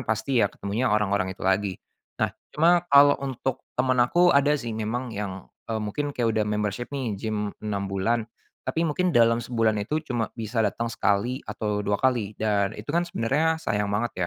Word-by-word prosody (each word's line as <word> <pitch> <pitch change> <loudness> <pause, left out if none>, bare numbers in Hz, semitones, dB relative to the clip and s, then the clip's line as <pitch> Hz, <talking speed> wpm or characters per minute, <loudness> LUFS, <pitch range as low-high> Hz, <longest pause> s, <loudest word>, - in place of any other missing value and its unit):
pasti 115 +3 +1
ya 100 - +3
ketemunya 105 +6 -2
orang-orang 100 -3 +1
itu - - -8
lagi. 95 0 +1 0.4
Nah, 110 -1 +1 0.2
cuma 170 +3 +4
kalau 140 0 +7
untuk 135 -1 -3 0.2
temen 130 0 +2
aku, 175 +9 +4
ada 145 +1 +4
sih 120 -4 -5
memang 115 +3 -3
yang, 100 -2 -5 0.2
eee, 110 -1 -1
mungkin 145 +7 -3
kayak 115 -2 +1
udah 110 -1 +1
membership 105 +2 -2
nih, 130 -6 -2
gim 105 0 -3
6 100 -2 -2
bulan. 110 +4 0 0.4
Tapi 160 +6 0
mungkin 175 +3 +1
dalam 115 0 +5
sebulan 115 -3 0
itu 110 +10 -2 0.2
cuma 115 -2 0
bisa 115 0 -2
datang 115 +2 -1
sekali 120 +8 0
atau 105 -2 -2
2 105 0 0
kali 115 -4 0
dan 100 -2 0
itu 105 - -8
kan 170 - +3
sebenarnya 155 +5 +1
sayang 105 -10 -1
banget, 105 +4 -1
115 Hz, 180 wpm, -25 LUFS, 105-130 Hz, 0.4 s, kalau